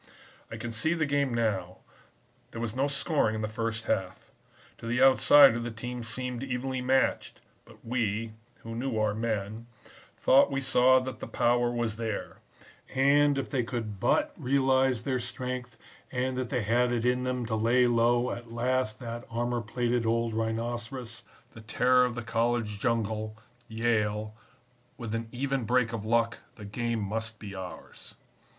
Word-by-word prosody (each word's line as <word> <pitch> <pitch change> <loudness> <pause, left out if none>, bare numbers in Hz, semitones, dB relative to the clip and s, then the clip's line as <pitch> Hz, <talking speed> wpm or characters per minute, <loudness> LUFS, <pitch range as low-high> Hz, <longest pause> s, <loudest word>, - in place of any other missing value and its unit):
"I - - -7
can 120 - -5
see 155 +10 +1
the 160 -2 +1
game 140 -2 +1
now; 105 -6 -1 0.7
there 115 - -8
was 115 -1 -3
no 135 +2 +1
scoring 140 -5 +1
in 110 - -3
the - - 0
first 115 +1 -3
half. 95 -3 -3 0.5
To 115 - -8
the 120 +2 0
outsider 135 -1 +7
the 120 0 -4
teams 120 +1 -6
seemed 125 +1 -4
evenly 130 0 -3
matched, 130 +1 +1 0.3
but - - -18
we, 115 -2 -1 0.3
who 115 - -7
knew 120 0 -2
our 110 -1 +1
men, 110 0 -3 0.5
thought 135 +2 +5
we 135 -1 -1
saw 130 -1 +5
that 130 -3 -6
the - - -6
power 120 0 +2
was 120 -3 -2
there; 110 -2 -4 0.6
and 140 +1 +4
if 135 - -2
they 130 -3 -1
could 115 -4 -5
but - - +2
realize 130 -2 +2
their 130 -2 -1
strength 125 0 -5 0.3
and 130 0 -1
that 130 -2 -3
they 125 -5 -1
had 120 +3 +2
it 120 -1 -1
in 125 0 +2
them 125 -1 -2
to 110 -1 -2
lay 120 +3 +3
low 120 +1 +2
at 120 -1 -7
last 120 -1 0
that 120 0 -6
armor 120 +1 -1
plated 120 +1 -1
old 115 0 +1
rhinoceros, 115 +2 -3 0.3
the 115 - -11
terror 125 +3 +3
of 125 -1 -3
the 120 - -4
college 115 -2 -1
jungle 110 -1 -1 0.3
Yale, 110 -2 0 0.6
with 115 -3 -5
an 115 0 -3
even 135 +1 -1
break 120 +1 +1
of 110 -3 -4
luck, 115 +1 +1 0.2
the 105 - -10
game 115 +2 -2
must 110 +2 -4
be 100 -2 -8
ours. 90 -4 -10
120 Hz, 165 wpm, -28 LUFS, 110-125 Hz, 0.7 s, outsider